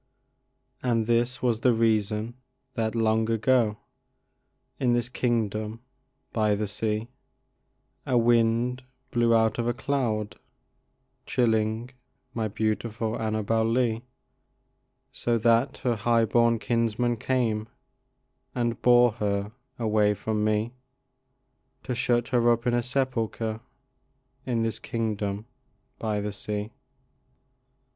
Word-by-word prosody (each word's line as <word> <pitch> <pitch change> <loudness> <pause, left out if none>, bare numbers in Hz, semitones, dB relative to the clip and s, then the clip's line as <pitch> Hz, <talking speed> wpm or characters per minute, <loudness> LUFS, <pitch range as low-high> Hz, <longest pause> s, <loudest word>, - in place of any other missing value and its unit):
And 115 -3 +1
that 120 +2 +1
was 120 -3 +2
the 125 +1 +4
reason 110 0 +1 0.4
that, 115 -2 -1
long 110 0 +2
ago, 115 -1 +2 1.0
In 125 -2 +2
this 120 0 0
kingdom 110 -3 -1 0.5
by 105 -2 +2
the 105 +1 -1
sea, 105 +2 -2 1.0
A 125 - +2
wind 120 +2 +2 0.3
blew 120 -1 +3
out 110 0 +2
of 120 - 0
a 120 - 0
cloud, 120 -6 -1 0.9
chilling 110 0 +1 0.4
My 115 -3 -1
beautiful 110 +1 -2
Annabel 110 0 0
Lee, 115 0 +1 1.1
So 120 -1 0
that 115 +4 +2
her 120 -2 +2
high 115 +1 +3
born 115 +1 +3
kinsmen 115 +2 0
came 110 -3 0 0.9
And 120 -2 -1
bore 120 -1 +6
her 100 0 -1 0.3
away 105 -2 +2
from 105 +1 -2
me, 110 +2 0 1.1
To 125 - -3
shut 120 -1 +1
her 120 -2 +3
up 115 0 +2
in 120 - +2
a 120 - +2
sepulcher 115 -3 -2 0.9
In 115 -3 +1
this 115 -1 -2
kingdom 105 -2 -3 0.5
by 110 -2 -1
the 105 0 -3
sea. 105 +2 -4
115 Hz, 110 wpm, -26 LUFS, 110-120 Hz, 1.1 s, bore